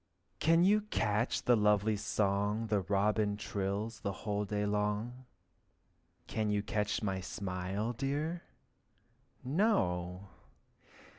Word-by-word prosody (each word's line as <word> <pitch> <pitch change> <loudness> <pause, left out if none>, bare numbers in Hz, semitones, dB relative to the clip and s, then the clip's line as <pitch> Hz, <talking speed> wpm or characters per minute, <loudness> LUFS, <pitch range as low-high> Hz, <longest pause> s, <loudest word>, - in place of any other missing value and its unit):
Can 165 +2 +4
you 210 +3 +5
catch 115 - 0
the 120 - +5
lovely 105 0 +3
song 105 +2 0 0.2
Robin 105 +1 +2
trills 105 +2 -3
the 100 -4 -2
whole 105 -1 0
day 105 0 -1
long? 105 +5 -1 1.0
Can 110 -1 -1
you 105 -1 +1
catch 105 0 -1
my 95 -2 -1
smile, 95 +4 -3
dear? 145 +7 -2 1.0
No! 95 - 0
105 Hz, 100 wpm, -33 LUFS, 100-120 Hz, 1.0 s, you